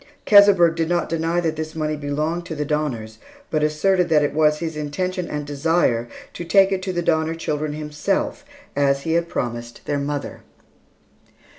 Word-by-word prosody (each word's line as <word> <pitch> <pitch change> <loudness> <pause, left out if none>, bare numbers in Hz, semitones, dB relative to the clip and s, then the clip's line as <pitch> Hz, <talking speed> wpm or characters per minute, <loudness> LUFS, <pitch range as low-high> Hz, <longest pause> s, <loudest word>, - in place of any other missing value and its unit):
Keseberg 200 -5 +7
did 165 0 -1
not 175 -1 0
deny 165 +1 0
that 160 -2 -1
this 155 0 -5
money 155 -1 -1
belonged 150 +4 -2
to 160 - -5
the 150 0 -2
Donners, 125 -8 -3 0.3
but 155 - +1
asserted 175 +4 +2
that 150 -2 +4
it 145 - -1
was 150 0 +3
his 160 0 -4
intention 175 +4 -3
and 150 -1 -4
desire 145 -5 +1 0.3
to - - -6
take 195 +3 +4
it 190 -1 0
to 185 0 -3
the 175 -1 -2
Donner 160 0 +1
children 150 -2 -3
himself 150 - -2 0.3
as 140 -1 +2
he 160 - -1
had 170 0 +1
promised 120 -1 -5
their 145 - -1
mother. 145 0 -4
155 Hz, 175 wpm, -22 LUFS, 145-170 Hz, 0.3 s, Keseberg